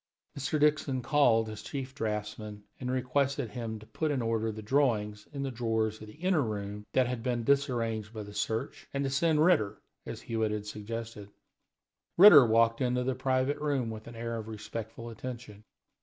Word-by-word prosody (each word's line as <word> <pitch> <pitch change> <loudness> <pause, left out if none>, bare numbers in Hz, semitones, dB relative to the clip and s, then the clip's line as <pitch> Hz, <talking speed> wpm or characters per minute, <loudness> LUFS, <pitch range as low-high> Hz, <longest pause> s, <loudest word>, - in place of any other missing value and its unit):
Mr. 140 +2 -1
Dixon 145 -3 +2
called 120 -5 +4
his 110 -1 -7
chief 135 -2 -5
draughtsman 105 -3 -4 0.2
and 125 - -4
requested 130 0 0
him 115 -1 -4
to 110 - -13
put 155 +7 -2
in 145 -3 0
order 115 -1 0
the 110 0 -8
drawings 105 -5 +1
in 140 -2 -4
the 135 - -2
drawers 110 -2 -1
of 110 - -9
the 105 - -12
inner 180 0 +1
room 105 -3 -4
that 130 - +4
had 125 -1 -3
been 120 -1 -1
disarranged 115 -5 0
by 110 -2 -6
the 105 0 -10
search, 110 +2 -3
and 140 - 0
to 135 - -1
send 155 +2 +3
Ritter, 150 - +2 0.3
as - - -6
Hewitt 110 -1 -1
had 105 -1 -3
suggested. 105 0 -6 0.9
Ritter 170 - +10
walked 115 +2 +3
into 125 0 +1
the 130 +1 0
private 130 +2 0
room 140 -6 0
with 110 0 -8
an 120 - -9
air 115 0 -3
of 110 -1 -6
respectful 110 +1 -7
attention. 115 -3 -8
115 Hz, 185 wpm, -30 LUFS, 110-135 Hz, 0.9 s, Ritter